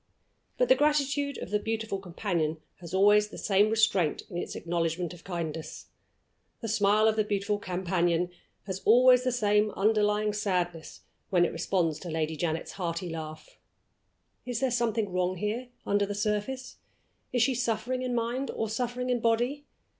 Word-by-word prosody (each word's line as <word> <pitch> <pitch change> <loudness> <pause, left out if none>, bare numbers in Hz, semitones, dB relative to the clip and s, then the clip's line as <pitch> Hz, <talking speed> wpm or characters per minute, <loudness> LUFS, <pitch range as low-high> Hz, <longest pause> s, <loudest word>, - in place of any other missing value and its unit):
But - - +3
the - - +7
gratitude 285 - +1
of - - -7
the 210 - +2
beautiful 220 -2 -3
companion 170 -4 -2 0.2
has 170 -2 -10
always 205 +2 +5
the - - -11
same 205 +1 +3
restraint 215 -8 +2
in 175 - -4
its - - -5
acknowledgment 170 0 -2
of 175 - -14
kindness; 165 -3 -5 0.7
the 225 - -5
smile 215 0 +3
of 220 - +3
the 215 - +2
beautiful 205 0 -1
companion 180 -2 0 0.3
has 190 -1 -4
always 250 +2 +6
the 255 - +1
same 210 -3 +2
underlying 210 0 +2
sadness 180 -6 -2 0.3
when 175 -2 +4
it - - -2
responds 165 -2 0
to 175 - -7
Lady 160 0 -1
Janet's 160 +1 -2
hearty 175 -1 -3
laugh. 155 -1 -8 0.8
Is 245 -2 -3
there 265 -1 +1
something 225 -4 0
wrong 180 0 0
here, 210 +7 -3 0.2
under 205 0 +1
the 205 - -3
surface? 210 +5 -2 0.5
Is 245 -2 +3
she 265 - +2
suffering 240 +1 -1
in 250 -1 -2
mind, 240 +4 -1
or 225 - -2
suffering 245 +2 -2
in 245 - +1
body? 240 +6 0
210 Hz, 160 wpm, -28 LUFS, 180-235 Hz, 0.8 s, the